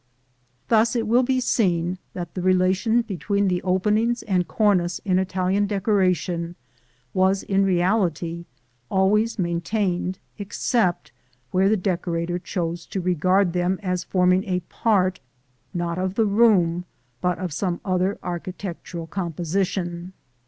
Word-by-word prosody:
Thus 225 Hz, +1 st, +3 dB
it 230 Hz, -2 st, 0 dB
will 235 Hz, +3 st, +4 dB
be 260 Hz, 0 st, +1 dB
seen 180 Hz, -7 st, +1 dB, 0.2 s
that 175 Hz, -2 st, -5 dB
the 185 Hz, -, -4 dB
relation 185 Hz, +5 st, +2 dB
between 200 Hz, 0 st, -1 dB
the 180 Hz, -1 st, 0 dB
openings 210 Hz, +6 st, +1 dB
and 180 Hz, -4 st, 0 dB
cornice 180 Hz, -3 st, +2 dB
in 185 Hz, -2 st, +2 dB
Italian 190 Hz, +2 st, 0 dB
decoration 185 Hz, -4 st, 0 dB, 0.6 s
was 190 Hz, +1 st, +2 dB
in 195 Hz, 0 st, +2 dB
reality 175 Hz, -3 st, 0 dB, 0.4 s
always 210 Hz, +4 st, +2 dB
maintained 180 Hz, +1 st, -1 dB, 0.2 s
except 200 Hz, -1 st, 0 dB, 0.4 s
where 190 Hz, +1 st, +3 dB
the 215 Hz, -, +3 dB
decorator 175 Hz, -2 st, -1 dB
chose 170 Hz, -2 st, -4 dB
to 195 Hz, -, -3 dB
regard 185 Hz, +1 st, +2 dB
them 180 Hz, +1 st, 0 dB
as 180 Hz, -2 st, -1 dB
forming 180 Hz, 0 st, +2 dB
a 180 Hz, -2 st, -1 dB
part, 185 Hz, 0 st, +1 dB, 0.5 s
not 175 Hz, 0 st, -2 dB
of 185 Hz, +1 st, -2 dB
the 225 Hz, -, +3 dB
room, 195 Hz, -5 st, +3 dB, 0.4 s
but 180 Hz, -1 st, +1 dB
of 180 Hz, -4 st, -4 dB
some 175 Hz, +1 st, -1 dB
other 185 Hz, +1 st, +1 dB
architectural 175 Hz, -1 st, -5 dB
composition. 175 Hz, +1 st, -2 dB
185 Hz, 125 wpm, -23 LUFS, 175-200 Hz, 0.6 s, will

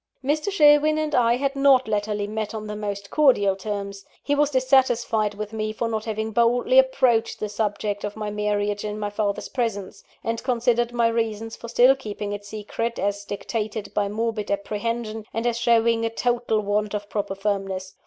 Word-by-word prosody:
Mr. 305 Hz, +6 st, 0 dB
Sherwin 305 Hz, -3 st, +5 dB
and 310 Hz, -1 st, -1 dB
I 235 Hz, -2 st, +4 dB
had 275 Hz, +2 st, -1 dB
not 275 Hz, -2 st, +4 dB
latterly 210 Hz, -1 st, -1 dB
met 215 Hz, +1 st, -4 dB
on 215 Hz, -1 st, -5 dB
the 210 Hz, 0 st, -5 dB
most 200 Hz, -1 st, -5 dB
cordial 245 Hz, -10 st, +4 dB
terms. 200 Hz, 0 st, -5 dB, 0.2 s
He 290 Hz, -, 0 dB
was 290 Hz, 0 st, +3 dB
dissatisfied 245 Hz, -5 st, +2 dB
with 210 Hz, +1 st, -6 dB
me 215 Hz, 0 st, -2 dB
for 230 Hz, +2 st, -2 dB
not 220 Hz, -1 st, -3 dB
having 220 Hz, 0 st, -3 dB
boldly 240 Hz, -, +4 dB
approached 255 Hz, -, +2 dB
the 215 Hz, -, -2 dB
subject 205 Hz, -1 st, -2 dB
of 205 Hz, 0 st, -4 dB
my 210 Hz, -1 st, -4 dB
marriage 205 Hz, 0 st, -1 dB
in 210 Hz, 0 st, -4 dB
my 205 Hz, -1 st, -3 dB
father's 205 Hz, -1 st, -2 dB
presence; 220 Hz, -6 st, -3 dB, 0.2 s
and 230 Hz, 0 st, -2 dB
considered 240 Hz, -1 st, +1 dB
my 235 Hz, -1 st, +2 dB
reasons 225 Hz, -1 st, -2 dB
for 235 Hz, -, -9 dB
still 245 Hz, +3 st, +5 dB
keeping 210 Hz, -5 st, -5 dB
it 205 Hz, 0 st, -6 dB
secret, 215 Hz, +3 st, -4 dB
as 205 Hz, 0 st, -1 dB
dictated 210 Hz, 0 st, -4 dB
by 205 Hz, -1 st, 0 dB
morbid 220 Hz, 0 st, -2 dB
apprehension, 215 Hz, +2 st, -3 dB
and 225 Hz, +1 st, -1 dB
as 235 Hz, -1 st, 0 dB
showing 230 Hz, -1 st, +3 dB
a 225 Hz, -, +1 dB
total 240 Hz, -1 st, 0 dB
want 210 Hz, +1 st, -1 dB
of 205 Hz, 0 st, -4 dB
proper 205 Hz, -2 st, -3 dB
firmness. 195 Hz, -2 st, -3 dB
220 Hz, 185 wpm, -24 LUFS, 205-240 Hz, 0.2 s, Sherwin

